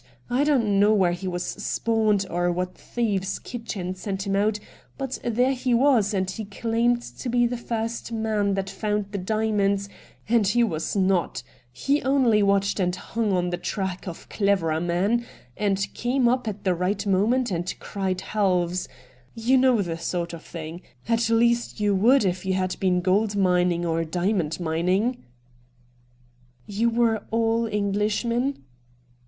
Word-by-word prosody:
I 255 +4 +3
don't 230 -9 +2
know 205 +1 +5
where 185 -4 +3
he 175 +2 -4
was 180 -1 -2
spawned, 215 -1 0
or 175 +1 0
what 180 +1 -2
thieves' 205 -5 -2
kitchen 215 -7 -5
sent 195 +1 -4
him 195 0 0
out, 210 +1 +1 0.4
but 270 -1 -4
there 245 +3 +2
he 250 -1 0
was, 235 -5 +3
and 190 -2 0
he 205 +4 -5
claimed 230 +3 0 0.2
to 250 - -3
be 240 0 +3
the 240 +1 -1
first 230 0 -4
man 215 -3 0
that 195 0 -2
found 210 0 -2
the 200 - -3
diamonds, 200 -1 0 0.4
and 225 -2 +3
he 240 +4 +3
was 165 -6 -2
not; 190 -7 +1 0.3
he 275 - 0
only 260 -6 +3
watched 200 0 +2
and 180 -1 +1
hung 220 +3 -2
on 180 -1 0
the 175 - -2
track 190 -1 -3
of 170 - -8
cleverer 185 -6 +1
men, 190 +7 +1 0.3
and 195 -1 -1
came 245 +1 +1
up 250 0 +1
at 210 -1 -4
the 185 - +2
right 190 +4 -1
moment 215 +5 +2
and 175 0 -3
cried 190 -2 -3
halves 185 -4 0 0.2
— 125 -1 -30
you 235 +4 +2
know 255 -5 +4
the 165 -2 -4
sort 170 0 -3
of 165 - -7
thiDg 165 +1 -8 0.2
— 125 - -22
at 230 0 +2
least 235 0 +2
you 205 -1 +2
would 225 +5 +4
if 180 -1 -1
you 190 -1 0
had 185 -1 -1
been 180 -2 +2
gold 200 +3 +1
mining 180 -3 +2
or 165 0 0
diamond 175 0 -1
mmmg. 180 +9 0 0.7
* 125 0 -35
You 215 +3 0
were 230 -2 +2
all 230 0 +1
Englishmen 210 - -1
200 Hz, 165 wpm, -25 LUFS, 180-230 Hz, 0.7 s, know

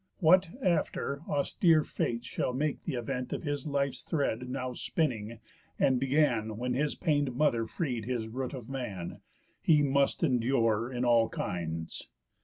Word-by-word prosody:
What, 185 +3 +5 0.2
after, 160 -5 0
austere 155 +2 +3
Fates 120 -3 -2
shall 125 0 -2
make 145 +3 -1
th' 160 - -2
event 125 +1 -3
Of - - -4
his 145 -2 -2
life's 140 -1 0
thread, 125 -5 -1
now 130 -1 -3
spinning, 115 -6 -2 0.4
and 130 -2 +3
began 125 -6 +1
When 125 +2 -1
his 145 +3 0
pain'd 145 -7 0
mother 120 -5 +2
freed 125 -10 -3
his 120 -2 -2
root 130 +4 -4
of 120 -4 -8
man, 115 -10 -5 0.4
He 150 -2 +4
must 140 +3 +2
endure 120 -4 +2
in 125 0 -1
all 115 -2 +4
kinds. 80 -2 -4
130 Hz, 150 wpm, -30 LUFS, 115-145 Hz, 0.4 s, What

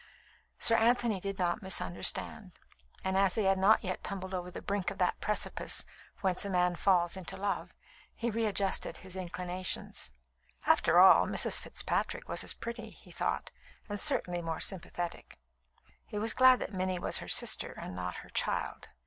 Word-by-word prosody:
Sir 230 - +5
Anthony 235 -2 +2
did 195 +1 -5
not 175 +1 -1
misunderstand, 95 - 0 0.5
and 190 0 -1
as 195 -1 +3
he 220 - +1
had 195 0 +2
not 205 +4 +4
yet 185 -2 -3
tumbled 190 -1 -5
over 180 -1 -4
the - - -7
brink 200 -2 -2
of 200 - -8
that 180 -2 0
precipice 210 - +1 0.4
whence 185 -2 0
a 200 - -4
man 180 -1 +1
falls 175 -2 +2
into 190 -2 -6
love, 200 +1 -3 0.4
he 235 0 -2
readjusted 210 -3 -1
his 185 -1 -9
inclinations. 185 0 -4 0.6
After - - +4
all, - - +7
Mrs. - - +3
Fitzpatrick - - -2
was - - +1
as - - -2
pretty, 230 -1 -7
he - - -16
thought, - - -2 0.4
and 205 -2 -4
certainly 175 -2 +2
more 165 -1 -4
sympathetic. 175 -2 -3 0.7
He 210 - -6
was 215 +1 -1
glad 255 0 +6
that 200 - -5
Minnie 185 -1 -1
was 175 - +1
her - - -8
sister, - - +4
and 90 - -7
not 90 -1 -4
her - - -17
child. - - -2
190 Hz, 165 wpm, -31 LUFS, 180-205 Hz, 0.7 s, all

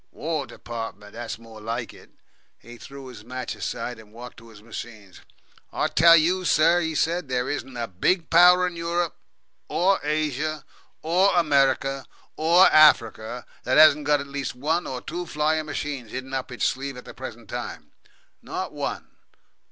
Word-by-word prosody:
"War 155 -3 -3
Departments; 115 -3 -8
that's 120 +1 -6
more 115 -1 -13
like 115 +2 -4
it." - - -17 0.5
He 120 0 -14
threw 135 +4 -11
his 120 -5 -11
match 130 +2 -5
aside, 120 -2 -5
and 105 -1 -16
walked 120 +2 -11
to 115 0 -15
his 105 -2 -16
machine. 110 -4 -9 0.6
"I - - -1
tell 165 +1 +7
you, 180 +4 +1
sir," 165 +3 +4
he 160 -2 -2
said, 165 -1 0
"there 125 0 -1
isn't 135 -3 -4
a 115 -1 -3
big 160 - 0
Power 180 +1 +7
in 180 -1 -4
Europe, 170 0 -2 0.5
OR 190 +3 +2
Asia, 150 0 -2 0.4
OR 180 +5 +3
America, 135 -3 +2 0.3
OR 170 +4 +5
Africa, 120 -6 +4 0.2
that 130 - +1
hasn't 150 -1 +6
got 145 -1 +4
at - - -5
least 140 -2 -5
one 160 +7 -1
or 130 -1 -5
two 175 +2 -5
flying 155 +1 0
machines 145 -5 -5
hidden 130 +1 -6
up 130 -1 -3
its 125 - -2
sleeve 135 0 -2
at 125 - -11
the - - -10
present 120 -4 -9
time. - - -7 0.5
Not - - -5
one. - - -4
140 Hz, 165 wpm, -24 LUFS, 120-160 Hz, 0.6 s, tell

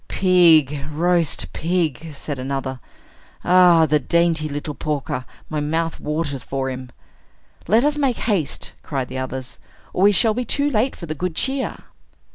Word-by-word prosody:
"Pig, 160 -7 +4
roast 170 +1 0
pig!" 165 -3 -1
said 145 -1 -6
another. 130 0 -3 0.7
"Ah, 175 -2 +6
the 150 0 +2
dainty 165 +2 +1
little 145 +1 -4
porker. 140 -4 -3 0.2
My 155 - -3
mouth 160 +2 -1
waters 150 -4 -3
for 135 -1 -3
him." 130 0 -7 0.8
"Let 230 +6 +4
us 295 0 +1
make 265 -5 +1
haste," 185 - -2
cried 135 -4 -3
the 130 +1 -4
others, 130 0 -6 0.3
"or - - -1
we 200 +1 +7
shall 220 +2 +4
be 250 +3 -2
too 285 +5 0
late 240 +2 +1
for 170 - -8
the 155 - -4
good 175 +2 -3
cheer!" 265 +5 -1
160 Hz, 155 wpm, -21 LUFS, 140-180 Hz, 0.8 s, we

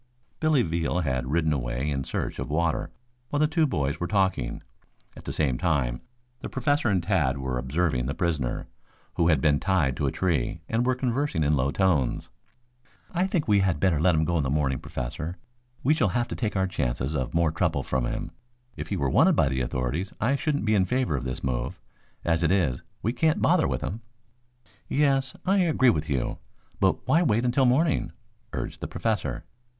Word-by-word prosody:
Billy 155 -5 +3
Veal 85 +2 -1
had 65 -5 -1
ridden 80 0 +2
away 65 +2 -2
in 65 -1 -1
search - - -3
of - - -4
water 80 +2 0 0.4
while 145 - -1
the 155 - +5
two 160 0 +2
boys 70 - -1
were 85 - -2
talking. 95 - 0 0.5
At - - -12
the - - -3
same 65 -5 0
time 70 -9 0 0.4
the - - -6
Professor 135 -1 +1
and 95 -4 +1
Tad 80 -9 +1
were 65 -2 -2
observing 65 -1 0
the 70 - -3
prisoner, 80 -9 -1 0.5
who 85 - +2
had 75 -5 +3
been 70 -1 +3
tied 85 -9 +1
to 70 - 0
a - - 0
tree, 80 -4 -1
and 120 +2 0
were 130 - +3
conversing 130 - 0
in 75 +1 +3
low 70 0 +1
tones. 75 -7 +1 0.8
"I 180 +1 +1
think 175 -5 -1
we 105 -2 +4
had 95 -5 +1
better 90 -4 +2
let 90 0 +4
him 80 0 +2
go 85 0 +1
in - - +1
the 65 - -1
morning, 70 -3 0
Professor. 75 +8 -5 0.5
We 150 - +4
shall 155 - +2
have 120 +5 0
to - - -4
take 110 -4 -2
our 95 -1 +2
chances 70 -6 -2
of 65 +1 -2
more 85 -2 +3
trouble 80 - 0
from 65 -2 -1
him. - - -4 0.4
If - - -6
he 100 - -2
were 70 - 0
wanted - - +4
by 70 - +3
the 65 -1 -1
authorities, 65 +9 -2
I 125 +6 +2
shouldn't 145 -3 -1
be 110 - +2
in 95 -3 +3
favor 125 - 0
of 65 -1 -3
this 65 -1 -4
move. 65 -2 -2 0.5
As 85 -1 +2
it 80 0 +2
is, 85 -10 +1 0.2
we 115 - 0
can't 160 +2 +2
bother - - +3
with - - -2
him." 110 +5 -4 0.9
"Yes, 135 -2 +2
I 195 +2 +3
agree 155 -8 +4
with 75 - -3
you. 65 -4 -1 0.4
But - - +1
why 165 - +4
wait 120 -7 +2
until 125 +2 +3
morning?" 140 +5 +2 0.4
urged - - -5
the - - -3
Professor. 90 - -2
85 Hz, 200 wpm, -26 LUFS, -, 0.9 s, the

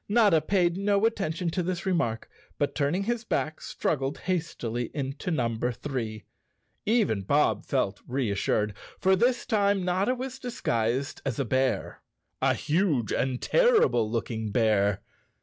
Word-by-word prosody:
Notta 205 -7 +5
paid 175 +1 +1
no 200 +1 +2
attention 180 -6 -1
to 180 - -1
this 180 +1 -3
remark 165 -12 0 0.3
but, 145 - 0
turning 155 +6 0
his 235 +2 -1
back, 155 -8 -2
struggled 135 -1 -2
hastily 125 -10 -2
into 135 +3 -3
number 120 -5 0
three. 115 -5 -4 0.6
Even 210 - +2
Bob 145 +10 +2
felt 105 -8 0
reassured, 105 -4 0 0.2
for 190 0 +3
this 240 +4 +1
time 200 -5 +2
Notta 190 +7 +1
was 260 +1 -6
dis¬ 245 -2 -7
guised 120 +4 0
as 135 -5 -2
a 140 - 0
bear—a 130 - -1
huge 150 - +1
and 130 -1 0
terrible 440 - +4
looking 110 -1 -2
bear. 100 -3 +2
150 Hz, 135 wpm, -27 LUFS, 115-195 Hz, 0.6 s, Notta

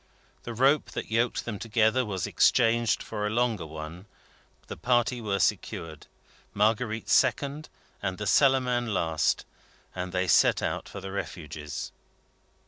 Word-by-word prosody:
The 120 - -5
rope 135 +5 +3
that - - -5
yoked 115 +2 0
them 110 -4 -4
together 115 +2 +2
was 95 -6 -3
exchanged 115 -2 +3
for 105 -1 -3
a - - -1
longer 110 -6 0
one; 80 +5 -8 0.6
the - - -7
party 120 0 +1
were 100 -3 -1
secured, 80 -4 -2 0.5
Marguerite 110 +2 +1
second, 140 +4 +1 0.3
and 95 0 -2
the 105 - -4
Cellarman 125 -2 +3
last; 80 -3 0 0.5
and 90 0 -4
they 95 0 0
set - - +4
out - - -3
for - - -8
the 95 - -7
Refuges. 75 -6 -6
110 Hz, 135 wpm, -27 LUFS, 95-120 Hz, 0.6 s, set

